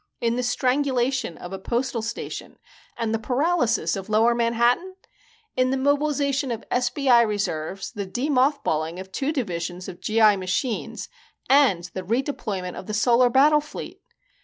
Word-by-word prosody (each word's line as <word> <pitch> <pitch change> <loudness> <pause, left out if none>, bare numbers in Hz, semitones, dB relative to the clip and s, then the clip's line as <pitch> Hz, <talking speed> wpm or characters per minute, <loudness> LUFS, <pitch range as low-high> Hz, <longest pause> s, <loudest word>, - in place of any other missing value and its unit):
in 235 0 0
the 250 - 0
strangulation 255 - 0
of 175 +2 -8
a 195 - -5
postal 240 +3 -2
station 230 +2 -6 0.4
and 225 -1 -1
the 225 - 0
paralysis 250 0 +1
of 195 +1 -7
Lower 225 +2 +4
Manhattan? 235 +10 +1 0.6
in 255 0 +2
the 265 - 0
mobilization 285 0 +1
of 230 -2 -5
SBI 245 0 +3
reserves, 195 -3 -3
the 205 -4 -5
de 245 +9 -2
mothballing 250 - +1
of 190 0 -9
two 275 +8 -1
divisions 180 - -4
of 175 - -9
G. 220 +1 0
I. 210 -2 +6
machines 190 +6 -3 0.4
and 260 -11 +4
the 190 - -4
redeployment 205 -4 -2
of - - -10
the 215 - -3
Solar 240 +3 +4
Battle 295 +4 +5
Fleet? 300 - -9
235 Hz, 155 wpm, -24 LUFS, 200-270 Hz, 0.6 s, I